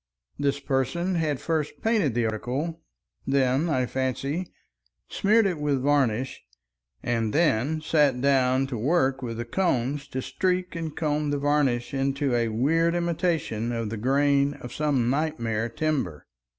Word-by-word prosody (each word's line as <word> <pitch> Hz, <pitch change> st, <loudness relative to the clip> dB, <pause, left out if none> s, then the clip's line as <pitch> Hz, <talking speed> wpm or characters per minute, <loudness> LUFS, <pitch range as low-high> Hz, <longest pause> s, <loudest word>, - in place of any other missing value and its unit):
This 140 Hz, -1 st, 0 dB
person 140 Hz, +7 st, -1 dB
had 155 Hz, -5 st, 0 dB
first 160 Hz, -3 st, -2 dB
painted 210 Hz, -, +2 dB
the 120 Hz, -1 st, +1 dB
article, 130 Hz, +10 st, -3 dB, 0.5 s
then, 135 Hz, +3 st, +2 dB
I 130 Hz, -4 st, +1 dB
fancy, 135 Hz, +7 st, -2 dB, 0.6 s
smeared 215 Hz, +2 st, +3 dB
it 180 Hz, -5 st, 0 dB
with 145 Hz, -3 st, 0 dB
varnish, 135 Hz, -4 st, +1 dB, 0.6 s
and 115 Hz, -3 st, 0 dB
then 155 Hz, -1 st, +2 dB
sat 150 Hz, -5 st, +2 dB
down 130 Hz, -1 st, +3 dB
to 130 Hz, -4 st, -4 dB
work 135 Hz, 0 st, +1 dB
with 115 Hz, -3 st, -4 dB
the 120 Hz, -, -3 dB
combs 140 Hz, -2 st, -1 dB
to 130 Hz, -2 st, -4 dB
streak 185 Hz, -1 st, -1 dB
and 165 Hz, -2 st, -5 dB
comb 150 Hz, -2 st, 0 dB
the 145 Hz, -, 0 dB
varnish 140 Hz, -4 st, +1 dB
into 135 Hz, 0 st, 0 dB
a 120 Hz, -1 st, +2 dB
weird 160 Hz, +10 st, +1 dB
imitation 165 Hz, -9 st, -1 dB
of 115 Hz, -3 st, -3 dB
the 115 Hz, -, -3 dB
grain 140 Hz, +4 st, +2 dB
of 125 Hz, -, -9 dB
some 145 Hz, -6 st, +1 dB
nightmare 120 Hz, -7 st, -1 dB
timber. 130 Hz, -, -2 dB
140 Hz, 145 wpm, -26 LUFS, 125-155 Hz, 0.6 s, smeared